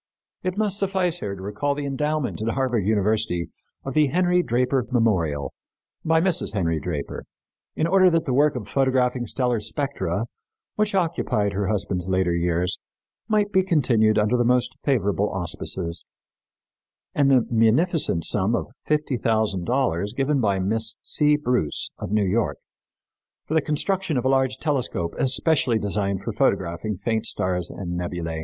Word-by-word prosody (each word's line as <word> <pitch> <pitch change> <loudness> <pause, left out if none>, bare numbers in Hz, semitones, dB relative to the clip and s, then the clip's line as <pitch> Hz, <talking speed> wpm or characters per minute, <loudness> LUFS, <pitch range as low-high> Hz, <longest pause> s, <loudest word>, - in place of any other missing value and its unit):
It 185 +1 -3
must 205 -2 0
suffice 185 -3 0
here 100 -1 -4
to 95 - -10
recall 125 +9 -1
the 145 0 -4
endowment 150 -2 -2
at 110 - -2
Harvard 125 -7 0
University 105 -4 +1 0.4
of 135 - -4
the 150 0 +4
Henry 180 +4 +2
Draper 125 -3 0
Memorial, 95 - 0 0.5
by 160 0 +3
Mrs. 175 - 0
Henry 85 -6 0
Draper, 75 -4 -5 0.5
in 155 - 0
order 185 +2 +5
that 165 -1 +1
the 130 - -1
work 145 +2 +3
of 110 -5 -5
photographing 130 -2 +1
stellar 125 -1 0
spectra, 110 - -2 0.5
which 210 -1 0
occupied 160 - 0
her 100 0 -1
husband's 95 -3 -1
later 95 -2 +1
years, 85 +1 0 0.5
might 210 -2 +1
be 190 -2 +4
continued 120 - +2
under 105 +3 +2
the 120 - +2
most 125 +1 +1
favorable 105 -6 +1
auspices, 90 -1 -3 1.1
and 140 -2 +3
the 130 -4 +4
munificent 115 - +2
sum 105 +3 +2
of - - -4
fifty 150 -3 0
thousand 110 -6 0
dollars 115 -5 0
given 135 0 +1
by 100 -3 +1
Miss 110 +4 0
C. 150 -1 +3
Bruce, 125 - -1
of - - -5
New 105 -1 +2
York, 105 +4 0 0.9
for - - -4
the 160 - +4
construction 165 +2 -1
of 125 - -1
a - - +3
large 130 -1 +2
telescope 125 - -2
especially 135 -2 +2
designed 100 -2 -2
for - - -3
photographing 85 +5 0
faint 110 +4 -2
stars 90 -2 -1
and 90 -2 -5
nebulæ. 85 -2 -4
120 Hz, 155 wpm, -24 LUFS, 100-150 Hz, 1.1 s, order